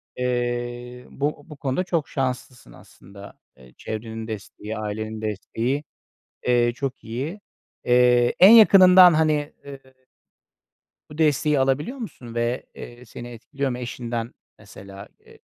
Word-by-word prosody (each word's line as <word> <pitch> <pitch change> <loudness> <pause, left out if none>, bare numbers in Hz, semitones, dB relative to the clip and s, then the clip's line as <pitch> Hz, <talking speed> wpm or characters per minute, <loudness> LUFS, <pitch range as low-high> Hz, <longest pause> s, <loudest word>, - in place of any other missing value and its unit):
Eee, 120 0 -3
bu 145 +1 -3
bu 150 - -10
konuda 140 +7 -2
çok 170 -5 -2
şanslısın 130 -2 -4
aslında. 100 +1 -15 0.2
Eee, 65 -1 -18
çevrenin 110 0 -6
desteği, 110 0 -7
ailenin 110 +1 -5
desteği, 115 +6 -3 0.6
eee, 120 -1 +3
çok 135 0 -5
iyi. 135 - -5 0.5
Eee, 125 0 +4
en 190 +4 +9
yakınından, 185 -5 +8
hani, 155 -1 +1
eee 140 -1 -9 1.3
bu 150 - -12
desteği 150 -2 +2
alabiliyor 140 - 0
musun 125 - -9
ve, 120 +1 -2
eee, 120 +1 -11
seni 120 +2 -9
etkiliyor 130 +4 -5
mu? 125 - -4
Eşinden 120 -1 -5 0.2
mesela, 100 +1 -12
eee, - - -19
125 Hz, 125 wpm, -23 LUFS, 115-145 Hz, 1.3 s, en